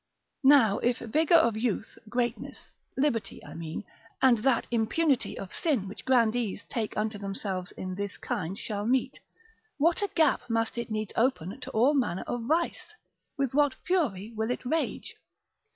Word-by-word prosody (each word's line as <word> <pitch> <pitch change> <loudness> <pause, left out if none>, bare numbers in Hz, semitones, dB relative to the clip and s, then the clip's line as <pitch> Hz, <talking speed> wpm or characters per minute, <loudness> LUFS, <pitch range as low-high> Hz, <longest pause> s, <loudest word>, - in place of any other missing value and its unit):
now 225 -8 +6
if 240 0 +1
vigour 310 +8 +3
of 235 -9 +3
youth, 220 -1 -2
greatness, 240 0 -3 0.2
liberty 235 -7 0
I - - -10
mean, 165 +3 -5 0.4
and 250 -4 +5
that 245 +1 +2
impunity 245 +5 +1
of 195 - -7
sin 270 - 0
which 195 - -9
grandees 235 -4 +2
take 220 -3 -2
unto 215 0 -1
themselves 195 -2 -4
in 185 0 -5
this 200 +1 -4
kind 195 -6 -3
shall 210 -1 -3
meet, 260 +1 +1 0.6
what 330 +6 +2
a 405 - 0
gap 315 -6 +2
must 225 0 0
it 235 - -4
needs 215 -2 -3
open 230 -3 0
to - - -7
all 245 +7 +3
manner 245 -10 0
of 240 -1 -3
vice, 330 +6 -1 0.4
with 275 -3 0
what 290 -1 +3
fury 235 - 0
will 220 +1 -1
it 250 - -3
rage? 320 +6 -2
235 Hz, 160 wpm, -28 LUFS, 210-270 Hz, 0.6 s, now